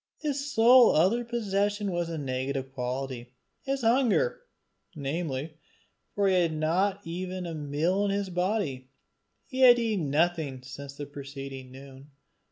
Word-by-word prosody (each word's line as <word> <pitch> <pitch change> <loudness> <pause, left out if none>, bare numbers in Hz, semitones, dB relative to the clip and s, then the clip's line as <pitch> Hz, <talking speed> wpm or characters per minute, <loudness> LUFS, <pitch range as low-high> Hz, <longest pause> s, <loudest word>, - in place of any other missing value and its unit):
His 285 -2 -3
sole 240 0 +6
other 195 +10 +3
possession 205 -3 -1
was 175 -1 -2
a 165 - -4
negative 135 -1 -3
quantity 125 -1 -4 0.3
his 275 0 -2
hunger, 250 - +2 0.5
namely, 150 +1 -4 0.6
for 200 -1 +2
he 190 - +3
had 165 -2 0
not 185 +6 0
even 180 +2 -4
a 170 - -5
meal 155 +6 0
in - - 0
his 200 -1 -2
body: 180 -8 -1 0.6
he 260 - -6
had 250 -2 +8
eaten 215 -10 -1
nothing 150 -4 0
since 140 +1 -9
the 145 - -6
preceding 135 -2 -8
noon. 135 +1 -13
170 Hz, 140 wpm, -28 LUFS, 140-205 Hz, 0.6 s, had